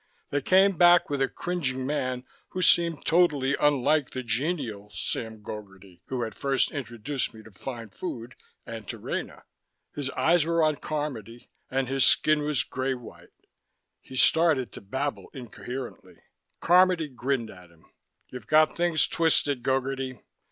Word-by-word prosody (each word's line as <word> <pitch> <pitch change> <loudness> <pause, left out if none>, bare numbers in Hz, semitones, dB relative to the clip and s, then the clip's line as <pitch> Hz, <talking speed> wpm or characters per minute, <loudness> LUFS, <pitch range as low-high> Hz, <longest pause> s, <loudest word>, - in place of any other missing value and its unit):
They 145 - 0
came 190 +4 +4
back 175 -1 +6
with 140 -1 -1
a 135 - +3
cringing 135 -8 -2
man 130 -3 -2 0.2
who 185 - -4
seemed 170 -2 +3
totally 150 -6 +3
unlike 145 0 +2
the 130 - -5
genial 120 - -2
Sam 110 0 -5
Gogarty 95 -4 -10
who 130 -2 -2
had 110 -2 -5
first 135 +3 +1
introduced 125 -1 -3
me 110 - -12
to 110 - -15
fine 115 +2 -7
food 120 - -7 0.3
and 110 -3 -8
to - - -5
Rena. - - -5 0.5
His 145 -2 -3
eyes 170 0 +4
were 165 +1 +1
on 155 -2 +2
Carmody, 125 -8 -5 0.2
and 130 0 -1
his 135 0 +1
skin 155 +4 +4
was 150 -2 0
gray 130 0 -2
white. 125 -2 -14 0.5
He 130 - -12
started 155 -3 +4
to - - -9
babble 135 +8 -4
incoherently. 125 +1 -8 0.5
Carmody 180 -2 +4
grinned 130 -3 -2
at 90 -2 -15
him. 85 -1 -24 0.4
"You've 125 -4 -9
got 155 0 +4
things 170 -2 +2
twisted, 150 -5 +1
Gogarty. 135 0 -1
135 Hz, 150 wpm, -27 LUFS, 120-155 Hz, 0.5 s, back